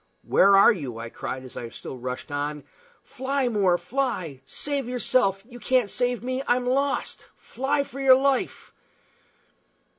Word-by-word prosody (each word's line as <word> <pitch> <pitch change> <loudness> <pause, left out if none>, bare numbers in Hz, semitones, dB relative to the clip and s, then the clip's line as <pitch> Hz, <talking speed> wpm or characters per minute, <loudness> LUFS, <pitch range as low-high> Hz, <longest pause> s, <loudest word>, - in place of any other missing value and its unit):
"Where 200 0 +5
are 200 - +8
you?" 135 - -6
I 115 0 -6
cried, 130 +3 -6
as 130 - -11
I 120 - -6
still 125 - -9
rushed 125 +2 -6
on. 145 0 -3 0.4
"Fly, 265 0 -2
More, 195 -6 +2
fly! 180 - -3
Save 280 - -2
yourself! 230 -6 +1
You 245 0 -12
can't 245 -2 +1
save 245 -1 -1
me. 255 +1 -2
I'm 245 0 +2
lost. 275 +3 -1
Fly 280 +3 -1
for 275 0 -10
your 265 -1 +7
life!" 270 -1 -1
240 Hz, 150 wpm, -25 LUFS, -, 0.4 s, are